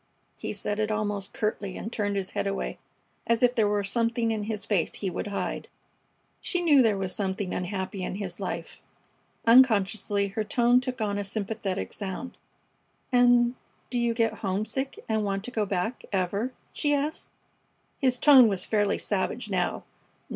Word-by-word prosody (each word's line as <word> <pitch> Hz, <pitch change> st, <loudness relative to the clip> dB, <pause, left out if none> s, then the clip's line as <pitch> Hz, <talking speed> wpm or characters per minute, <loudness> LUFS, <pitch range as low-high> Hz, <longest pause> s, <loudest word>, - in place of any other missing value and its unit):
He -, -, -5 dB
said 205 Hz, 0 st, -2 dB
it 215 Hz, 0 st, +1 dB
almost 205 Hz, -2 st, -1 dB
curtly 205 Hz, -3 st, -2 dB
and 225 Hz, -, -6 dB
turned 205 Hz, -2 st, -1 dB
his 195 Hz, -1 st, -2 dB
head -, -, -1 dB
away, 195 Hz, 0 st, -3 dB, 0.5 s
as 230 Hz, +1 st, +2 dB
if 245 Hz, 0 st, +5 dB
there 220 Hz, -4 st, +3 dB
were 205 Hz, 0 st, +1 dB
something 230 Hz, +2 st, 0 dB
in 215 Hz, -2 st, -2 dB
his 215 Hz, -1 st, -4 dB
face 195 Hz, -6 st, 0 dB
he 195 Hz, -3 st, -3 dB
would 205 Hz, -, -4 dB
hide. 200 Hz, -, -3 dB, 0.7 s
She 360 Hz, -, -1 dB
knew 305 Hz, -6 st, +5 dB
there 220 Hz, -4 st, +3 dB
was 190 Hz, -1 st, -2 dB
something 190 Hz, -1 st, -2 dB
unhappy 190 Hz, +1 st, -3 dB
in 180 Hz, -, -3 dB
his 200 Hz, 0 st, -5 dB
life. -, -, -5 dB, 0.6 s
Unconsciously 210 Hz, -4 st, +4 dB
her 215 Hz, +3 st, -2 dB
tone 240 Hz, +3 st, +3 dB
took 255 Hz, -2 st, -4 dB
on 205 Hz, -1 st, 0 dB
a -, -, -1 dB
sympathetic 200 Hz, -1 st, -3 dB
sound. 200 Hz, +5 st, -5 dB, 0.8 s
"And 245 Hz, -1 st, +5 dB, 0.4 s
do 245 Hz, -, 0 dB
you 235 Hz, -1 st, +1 dB
get 225 Hz, -2 st, +1 dB
homesick 215 Hz, +7 st, -2 dB
and 220 Hz, -1 st, +1 dB
want 195 Hz, -1 st, -1 dB
to 250 Hz, -, -6 dB
go 215 Hz, -4 st, 0 dB
back, 195 Hz, +5 st, -2 dB
ever?" 200 Hz, +5 st, 0 dB, 0.2 s
she 290 Hz, -1 st, +1 dB
asked. 290 Hz, +2 st, -2 dB, 0.7 s
His 255 Hz, -2 st, +2 dB
tone 265 Hz, -3 st, +8 dB
was 195 Hz, -3 st, -1 dB
fairly 205 Hz, -2 st, +1 dB
savage -, -, -2 dB
now. -, -, 0 dB
215 Hz, 170 wpm, -27 LUFS, 200-240 Hz, 0.8 s, tone